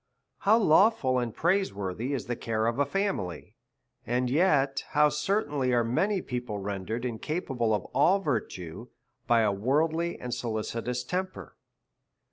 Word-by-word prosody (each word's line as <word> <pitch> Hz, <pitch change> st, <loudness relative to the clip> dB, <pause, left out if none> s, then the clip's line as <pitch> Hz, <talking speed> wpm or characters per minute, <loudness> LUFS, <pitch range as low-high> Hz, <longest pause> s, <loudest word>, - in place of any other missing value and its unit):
How 215 Hz, +3 st, +4 dB
lawful 160 Hz, -, +4 dB
and 120 Hz, -2 st, -2 dB
praise 190 Hz, -, +1 dB
worthy 100 Hz, +6 st, -3 dB
is 135 Hz, -4 st, -2 dB
the 120 Hz, -, -2 dB
care 110 Hz, -1 st, -2 dB
of 115 Hz, +3 st, 0 dB
a 145 Hz, -, +3 dB
fa 195 Hz, -, -3 dB
DEVOUT 200 Hz, -, +2 dB
AND -, -, -4 dB
HOLY 90 Hz, -, -3 dB
LIFE. -, -, -11 dB, 0.6 s
67 120 Hz, -, -3 dB
niily, -, -, +3 dB
and 125 Hz, 0 st, 0 dB
yet 140 Hz, -4 st, +2 dB
how 150 Hz, 0 st, +5 dB
ctMtainly 150 Hz, -5 st, 0 dB
are 120 Hz, -, +3 dB
many 190 Hz, -, +1 dB
people 125 Hz, -4 st, -4 dB
render 100 Hz, +1 st, -4 dB
ed 120 Hz, +1 st, -4 dB
incapable 125 Hz, -1 st, -2 dB
of 105 Hz, -3 st, 0 dB
all 170 Hz, +8 st, +4 dB
virtue 110 Hz, -, -4 dB, 0.4 s
by 120 Hz, -2 st, +4 dB
a 105 Hz, -2 st, +3 dB
worldly 155 Hz, +11 st, 0 dB
and 125 Hz, -1 st, -5 dB
solicitous 120 Hz, +1 st, -3 dB
temper 185 Hz, +7 st, -4 dB
125 Hz, 175 wpm, -28 LUFS, 115-160 Hz, 0.6 s, how